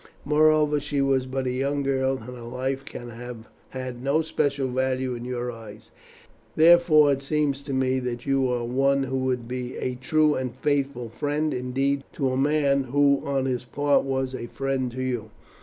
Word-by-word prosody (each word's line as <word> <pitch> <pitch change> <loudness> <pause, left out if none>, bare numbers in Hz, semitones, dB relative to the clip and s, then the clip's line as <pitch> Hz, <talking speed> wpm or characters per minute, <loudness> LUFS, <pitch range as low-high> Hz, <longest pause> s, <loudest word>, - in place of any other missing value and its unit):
Moreover, 150 0 +4
she 145 0 -2
was 135 -2 +2
but 130 0 -2
a 125 - 0
young 140 +3 -1
girl, 135 -1 +1
and 110 - -12
her 120 - -10
life 130 +3 -3
can 120 -3 -8
have 120 -1 -9 0.2
had 130 -2 -6
no 140 +4 +1
special 140 -3 0
value 130 0 -1
in 120 0 -6
your 125 -1 -3
eyes; 110 -1 -12 0.6
therefore, 160 -3 +6
it 135 0 0
seems 140 -1 0
to 140 - -7
me 130 0 +1
that 120 -1 -4
you 135 -2 +1
are 120 -1 -1
one 135 +3 +2
who 135 0 -2
would 130 -2 -1
be 125 0 -5
a 125 - -2
true 150 +4 +2
and 125 -3 -3
faithful 140 -4 -1
friend 145 +6 -1
indeed 135 +2 -1
to 135 -2 0
a - - -1
man 140 0 +2
who 140 +2 +3
on 135 -1 -1
his 125 -2 -1
part 145 +3 +1
was 130 -1 -2
a 120 -2 -5
friend 135 0 -2
to 130 +1 -3
you. 120 -4 -3
130 Hz, 190 wpm, -25 LUFS, 125-140 Hz, 0.6 s, therefore